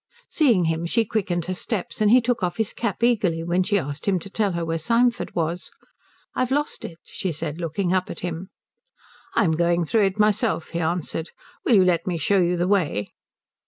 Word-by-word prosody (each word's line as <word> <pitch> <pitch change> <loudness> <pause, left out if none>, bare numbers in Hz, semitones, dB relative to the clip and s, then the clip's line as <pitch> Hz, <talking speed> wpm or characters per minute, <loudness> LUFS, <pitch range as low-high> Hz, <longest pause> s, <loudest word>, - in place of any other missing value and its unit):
Seeing 240 - +4
him, 165 +1 0
she 230 +6 +2
quickened 180 -6 -1
her 185 - -2
steps, 205 +2 -4
and 210 - +5
he 250 +3 +7
took 240 0 0
off 175 -1 -1
his 220 -3 -1
cap 235 0 -3
eagerly 195 -9 +2
when 175 +2 +1
she 205 +2 +2
asked 145 -2 -4
him 195 -2 +3
to 195 - -10
tell 205 -2 0
her 170 -1 -2
where 165 0 -1
Symford 235 +7 +1
was. 170 +1 -2 0.6
"I've 255 - 0
lost 290 +3 -1
it," 165 - -7
she 185 - -4
said, 160 +1 -5
looking 175 +3 -1
up 185 -1 0
at - - -6
him. 175 +2 -4 0.9
"I'm 200 -8 +3
going 170 +1 +2
through 215 +5 +3
it 195 +2 -5
myself," 210 -3 +1
he 170 - -2
answered. 165 0 -2 0.4
"Will 240 - +5
you 190 - +6
let 170 -1 +1
me 175 -2 0
show 195 +6 +2
you 175 0 +2
the 175 +1 +1
way?" 165 - +1
180 Hz, 205 wpm, -24 LUFS, 170-215 Hz, 0.9 s, he